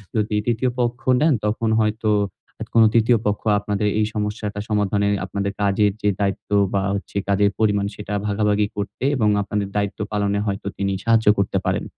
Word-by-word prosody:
যদি 105 -1 0
৩য় 120 +1 0
পক্ষ 120 0 -1 0.2
নেন, 155 -2 +4
তখন 110 +1 0
হয়তো 110 0 0 0.5
আ - - 0
কোন 115 - +7
৩য় 115 +1 +4
পক্ষ 105 0 -1 0.2
আপনাদের 105 0 -1
এই 105 - +3
সমস্যাটা 105 -1 -3
সমাধানে 100 -1 +1 0.2
আপনাদের 100 0 -3
কাজের 100 +1 +2
যে 105 - +2
দায়িত্ব 100 0 -2 0.2
বা, 100 - +2
হচ্ছে 100 0 -5
কাজের 100 0 +3
পরিমাণ, 105 -2 +2
সেটা 105 0 -6
ভাগাভাগি 105 0 +1
করতে 100 +4 -5
এবং 110 -5 +2
আপনাদের 100 0 -2
দায়িত্ব 100 -1 -2
পালনে 100 -1 0
হয়তো 100 0 -3
তিনি 100 -1 -1
সাহায্য 115 -1 +3
করতে 100 - 0
পারেন। - - 0
105 Hz, 170 wpm, -21 LUFS, 100-110 Hz, 0.5 s, কোন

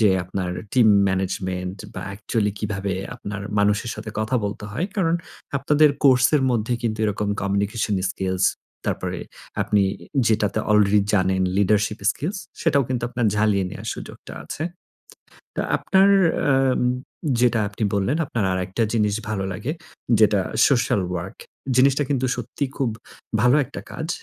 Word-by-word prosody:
যে, 105 -3 +5
আপনার 90 0 -3 0.2
team 120 -4 +5 0.2
management 95 0 -2 0.2
বা 95 - -5
actually 105 0 -1
কিভাবে 100 -2 -2 0.2
আপনার 100 -3 -6 0.2
মানুষের 105 +3 +2
সাথে 110 - -7
কথা 110 +4 0
বলতে 100 0 -4
হয়। 165 - -1
কারণ 170 -4 +2 0.4
আপনাদের 150 +2 +4
course 130 -1 +6
এর 135 - +1
মধ্যে 115 0 0
কিন্তু 110 -2 -1
এরকম 105 0 -1
communication 100 +1 0
skills 95 -1 -1 0.4
তারপরে - - -2 0.4
আপনি 105 -1 +2 0.5
যেটাতে 110 -1 +1
already 105 -1 +5
জানেন 95 -1 +2
leadership 105 +1 +2
skills 175 - -4 0.2
সেটাও 145 -4 +3
কিন্তু 125 -2 -2
আপনার 120 -1 -1
ঝালিয়ে 105 -2 +2
নেওয়ার - - -7
সুযোগটা - - -10
আছে। 155 - -5 0.9
তো - - 0 0.2
আপনার 195 +1 +4 0.4
আম 135 -1 +2 0.6
যেটা 120 -2 +3
আপনি 105 +2 -4
বললেন, 100 +10 +1
আপনার 115 -7 -1
আরেকটা 95 +4 -1
জিনিস 105 -2 +2
ভালো 100 -3 -1
লাগে। 125 +10 -3 0.5
যেটা 105 -2 +4 0.3
social 120 -6 +2
work। 85 0 -6 0.4
জিনিসটা 135 +2 +4
কিন্তু 130 -3 +1
সত্যিই 125 +3 -3
খুব 135 -4 +1 0.5
ভালো 125 +4 +5
একটা 140 - -8
কাজ 160 - -5
105 Hz, 140 wpm, -23 LUFS, 100-125 Hz, 0.9 s, course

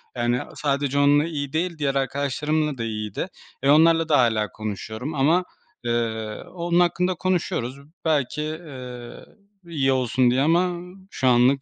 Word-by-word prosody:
Yani, 120 0 +1 0.2
sadece 140 -1 0
onunla 145 +2 +5
iyi 145 -4 -4
değil, 170 0 -1
diğer 140 -2 0
arkadaşlarımla 140 +2 0
da 115 - -3
iyiydi. 110 -2 -3 0.4
E, 140 - +3
onlarla 165 +2 +5
da 145 - +5
hâlâ 110 -4 +2
konuşuyorum. 110 +6 -5
Ama, 160 +7 +3 0.4
ııı, 110 -2 -2
onun 175 0 +1
hakkında 180 +1 +2
konuşuyoruz. 160 -8 -1 0.3
Belki, 150 -2 +1
ııı, 125 -7 -9 0.4
iyi 135 -5 +1
olsun 130 -1 +2
diye 130 +2 +2
ama 175 +3 +1 0.2
şu 130 - 0
anlık 125 +2 +4
140 Hz, 140 wpm, -24 LUFS, 120-160 Hz, 0.4 s, onunla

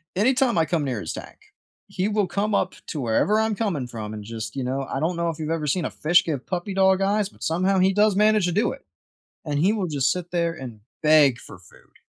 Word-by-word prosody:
any 220 +8 +3
time 250 -4 +1
I 165 - +3
come 165 -2 -1
near 130 -5 -2
his 85 - -5
tank, - - -9 0.5
he 185 - -2
will 210 -1 +1
come 205 +2 -1
up 185 - 0
to 155 - -4
wherever 135 - +2
I'm 220 0 +1
coming 195 - -2
from 110 -3 -7
and 105 -1 -7
just, 110 +3 -6
you 135 - -2
know, 135 +2 -2
I - - -2
don't 165 +4 0
know 170 0 -1
if 165 - -5
you've 155 0 -4
ever 160 -2 -2
seen 165 +4 0
a - - -3
fish 175 +3 +3
give 145 -6 -4
puppy 185 +2 -3
dog 190 0 +3
eyes, 200 +1 +1
but - - -14
somehow 185 +4 +1
he 190 +1 +3
does 210 0 +3
manage 210 -2 +3
to - - 0
do 205 +6 +1
it, - - -10 0.6
and 145 -2 -2
he 185 +7 +3
will 200 -5 -2
just 140 -3 +1
sit 180 -1 -5
there 170 -1 0
and 130 -8 -9 0.2
beg 150 -5 +5
for 95 - -12
food. 90 0 -21
170 Hz, 255 wpm, -24 LUFS, 140-195 Hz, 0.6 s, beg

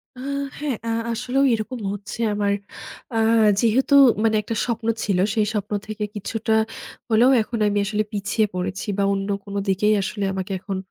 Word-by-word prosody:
আহ 255 - -9 0.4
হ্যাঁ। 290 -3 -1
আ - - 0 0.2
আসলেও 250 +4 0
এরকম 230 +3 -3
হচ্ছে 205 +2 -8
আমার 205 -1 +1 0.6
আ - - -1 0.4
যেহেতু 250 +5 +3 0.3
মানে 220 -1 +3
একটা 225 +2 -4
স্বপ্ন 235 -2 -3 0.2
ছিল 195 -3 0 0.2
সেই 215 -2 +1
স্বপ্ন 210 -1 -3 0.2
থেকে 215 0 -4
কিছুটা 220 +2 -2 0.6
হলেও 230 +3 +5
এখন 225 +1 -4
আমি 205 0 0
আসলে 210 +1 0
পিছিয়ে 205 +2 0
পড়েছি 185 +3 -3
বা, 200 - +2
অন্য 195 0 -3 0.2
কোনো 200 0 -5
দিকেই 205 +3 +3
আসলে 205 +1 -3
আমাকে 190 +1 -4
এখন 195 +1 -4
215 Hz, 165 wpm, -22 LUFS, 200-230 Hz, 0.6 s, হলেও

